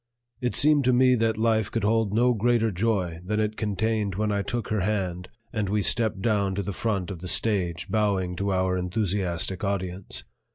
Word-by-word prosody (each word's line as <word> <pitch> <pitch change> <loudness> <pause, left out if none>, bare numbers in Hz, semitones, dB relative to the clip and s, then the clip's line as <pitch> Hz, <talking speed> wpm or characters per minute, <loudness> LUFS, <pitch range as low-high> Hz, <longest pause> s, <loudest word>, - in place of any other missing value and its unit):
It 125 -1 -1
seemed 145 0 +4
to 125 - +4
me 130 +1 +5
that 115 -2 +1
life 110 -2 +1
could 115 - -2
hold 110 -1 +2
no 120 +4 +3
greater 115 0 +2
joy 90 -4 -1
than 105 +3 -1
it 110 0 0
contained 110 -1 -1
when 105 +1 0
I 100 -1 0
took 120 +3 -3
her 110 - 0
hand 95 -3 -2 0.2
and 105 -4 -1
we 105 0 +1
stepped 110 -4 +1
down 100 -4 +1
to 100 - -2
the 100 - -4
front 100 -3 -2
of 90 - -7
the 90 - -7
stage 90 -5 +1
bowing 100 -5 0
to 100 +1 -1
our 95 0 +1
enthusiastic 90 -1 -1
audience. 95 -2 -3
105 Hz, 195 wpm, -26 LUFS, 95-110 Hz, 0.2 s, me